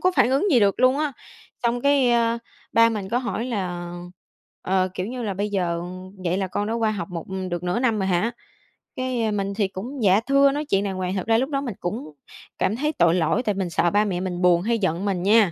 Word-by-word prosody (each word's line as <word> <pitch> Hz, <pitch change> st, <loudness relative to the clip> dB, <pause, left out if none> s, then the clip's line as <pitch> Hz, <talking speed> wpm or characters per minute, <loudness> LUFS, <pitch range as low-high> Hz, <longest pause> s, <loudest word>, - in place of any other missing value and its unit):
có 365 Hz, -, +3 dB
phản 245 Hz, -, +4 dB
ứng 280 Hz, +10 st, +2 dB
gì 250 Hz, -7 st, +5 dB
được 200 Hz, +1 st, +2 dB
luôn 255 Hz, +2 st, +4 dB
á. 300 Hz, -2 st, 0 dB, 0.5 s
Xong 240 Hz, 0 st, +1 dB
cái, 280 Hz, -2 st, +3 dB
ơ, 235 Hz, 0 st, +2 dB, 0.3 s
ba 230 Hz, 0 st, +6 dB
mình 210 Hz, -4 st, -3 dB
có 235 Hz, -, +1 dB
hỏi 235 Hz, -2 st, -3 dB
là, 180 Hz, -7 st, -3 dB, 0.7 s
ờ, 185 Hz, 0 st, +1 dB
kiểu 185 Hz, 0 st, -3 dB
như 245 Hz, +2 st, -5 dB
là 205 Hz, -4 st, -2 dB
"Bây 205 Hz, +2 st, -2 dB
giờ 175 Hz, -4 st, -1 dB, 0.4 s
vậy 175 Hz, +1 st, +1 dB
là 195 Hz, -, -1 dB
con 205 Hz, +3 st, -2 dB
đã 220 Hz, -, -2 dB
qua 225 Hz, -2 st, +1 dB
học 195 Hz, -6 st, -4 dB
một 170 Hz, -2 st, -5 dB, 0.3 s
được 175 Hz, 0 st, -3 dB
nửa 180 Hz, +6 st, 0 dB
năm 235 Hz, -4 st, +1 dB
rồi 190 Hz, -, 0 dB
hả?". 185 Hz, +5 st, +1 dB, 0.7 s
Cái 250 Hz, -4 st, -1 dB
mình 200 Hz, -1 st, -2 dB
thì 200 Hz, -1 st, 0 dB
cũng, 230 Hz, +7 st, -6 dB
"dạ 195 Hz, +1 st, +5 dB
thưa" 275 Hz, 0 st, +5 dB
nói 295 Hz, +2 st, -2 dB
chuyện 195 Hz, -8 st, +1 dB
đàng 195 Hz, -2 st, -3 dB
hoàng, 185 Hz, 0 st, -2 dB
thật 190 Hz, -, -3 dB
ra 225 Hz, 0 st, +4 dB
lúc 265 Hz, +4 st, 0 dB
đó 275 Hz, -2 st, -1 dB
mình 245 Hz, -8 st, -4 dB
cũng 175 Hz, -2 st, -4 dB, 0.5 s
cảm 210 Hz, -, +1 dB
thấy 300 Hz, +5 st, 0 dB
tội 170 Hz, -, +3 dB
lỗi 180 Hz, +7 st, +1 dB
tại 210 Hz, -4 st, 0 dB
mình 190 Hz, -2 st, -2 dB
sợ 170 Hz, +1 st, +2 dB
ba 210 Hz, +1 st, +3 dB
mẹ 185 Hz, -4 st, -2 dB
mình 180 Hz, -1 st, -3 dB
buồn 175 Hz, -1 st, +4 dB
hay 230 Hz, +4 st, +1 dB
giận 185 Hz, -1 st, -1 dB
mình 185 Hz, -3 st, -1 dB
nha. 205 Hz, -3 st, +5 dB
205 Hz, 250 wpm, -23 LUFS, 185-240 Hz, 0.7 s, ba